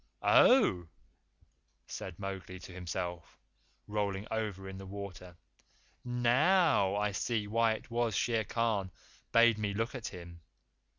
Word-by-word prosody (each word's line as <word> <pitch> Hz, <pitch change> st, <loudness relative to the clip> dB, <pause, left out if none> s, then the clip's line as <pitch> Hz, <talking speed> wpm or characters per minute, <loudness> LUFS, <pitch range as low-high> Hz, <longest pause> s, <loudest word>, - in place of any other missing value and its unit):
"Oh!" 90 Hz, -, +5 dB, 1.0 s
said 85 Hz, -, -7 dB
Mowgli 95 Hz, -2 st, -6 dB
to 90 Hz, +1 st, -11 dB
himself, 90 Hz, -1 st, -5 dB, 0.5 s
rolling 105 Hz, -1 st, -2 dB
over 105 Hz, -4 st, -3 dB
in 95 Hz, 0 st, -8 dB
the 95 Hz, -, -8 dB
water. 95 Hz, -3 st, -8 dB, 0.7 s
"NOW 125 Hz, -, +3 dB
I 105 Hz, 0 st, 0 dB
see 105 Hz, +2 st, -1 dB
why 115 Hz, +2 st, +2 dB
it 110 Hz, -, -9 dB
was 115 Hz, -3 st, 0 dB
Shere 115 Hz, -2 st, +1 dB
Khan 110 Hz, -5 st, 0 dB, 0.4 s
bade 115 Hz, -1 st, +5 dB
me 105 Hz, -2 st, -2 dB
look 115 Hz, +3 st, -1 dB
at 125 Hz, -4 st, -5 dB
him! 85 Hz, -2 st, -10 dB
105 Hz, 125 wpm, -32 LUFS, 95-115 Hz, 1.0 s, Oh